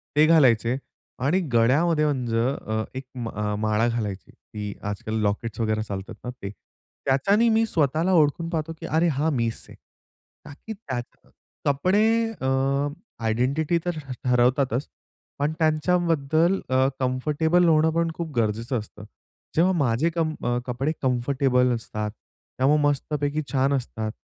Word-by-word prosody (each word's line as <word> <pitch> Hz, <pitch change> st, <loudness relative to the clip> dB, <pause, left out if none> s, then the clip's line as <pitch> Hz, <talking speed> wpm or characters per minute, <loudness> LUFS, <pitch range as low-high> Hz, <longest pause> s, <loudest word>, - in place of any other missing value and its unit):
ते 150 Hz, +1 st, +6 dB
घालायचे. 130 Hz, -7 st, +4 dB, 0.4 s
आणि 145 Hz, +9 st, +2 dB
गळ्यामध्ये 150 Hz, +7 st, +3 dB
म्हणजे 125 Hz, -6 st, 0 dB, 0.3 s
अ, 110 Hz, 0 st, -1 dB
एक 130 Hz, -, -4 dB, 0.6 s
माळा 110 Hz, +1 st, +1 dB
घालायची 105 Hz, -5 st, -3 dB
की 105 Hz, -1 st, -8 dB, 0.2 s
आजकाल 105 Hz, +2 st, -4 dB
लॉकेट्स 105 Hz, +2 st, -2 dB
वगैरे 110 Hz, -1 st, 0 dB
चालतात 100 Hz, -2 st, -6 dB
ना, 125 Hz, -, -4 dB
ते 120 Hz, -5 st, -7 dB, 0.6 s
त्याच्यानी 195 Hz, -, +3 dB
मी 225 Hz, 0 st, +3 dB
स्वतःला 160 Hz, -1 st, +1 dB
ओळखून 165 Hz, +1 st, +2 dB
पाहतो, 165 Hz, -1 st, -2 dB
की 165 Hz, -, -7 dB
अरे 165 Hz, +2 st, +2 dB
हा 155 Hz, 0 st, +1 dB
मीच 115 Hz, -6 st, -2 dB
आहे. -, -, -12 dB, 0.7 s
का, -, -, -9 dB
की 220 Hz, -, -4 dB
त्यात 130 Hz, -, -6 dB, 0.5 s
कपडे 180 Hz, +9 st, +2 dB, 0.4 s
अ, 130 Hz, -, -1 dB, 0.8 s
आयडेंटिटी 135 Hz, +9 st, +1 dB
तर 175 Hz, -2 st, -2 dB, 0.3 s
ठरवतातच. 125 Hz, +1 st, +2 dB, 0.5 s
पण 145 Hz, +2 st, +1 dB
त्यांच्याबद्दल 165 Hz, +1 st, +2 dB
अ, 130 Hz, +1 st, +3 dB
कम्फर्टेबल 150 Hz, +7 st, +1 dB
होणं 160 Hz, 0 st, +4 dB
पण 165 Hz, 0 st, +1 dB
खूप 170 Hz, -2 st, -5 dB
गरजेचं 115 Hz, +2 st, 0 dB
असतं. 105 Hz, 0 st, -11 dB, 0.5 s
जेव्हा 175 Hz, +4 st, +4 dB
माझे 140 Hz, -1 st, +1 dB
कम 160 Hz, -2 st, 0 dB, 0.3 s
कपडे 130 Hz, +4 st, -1 dB
कम्फर्टेबल 125 Hz, 0 st, +2 dB
असतात, 105 Hz, -2 st, -4 dB, 0.5 s
त्यामुळे 145 Hz, +4 st, +3 dB
मस्तपैकी 145 Hz, +1 st, 0 dB
छान 135 Hz, 0 st, +2 dB
असतात 110 Hz, -5 st, -3 dB
140 Hz, 130 wpm, -25 LUFS, 120-160 Hz, 0.8 s, ते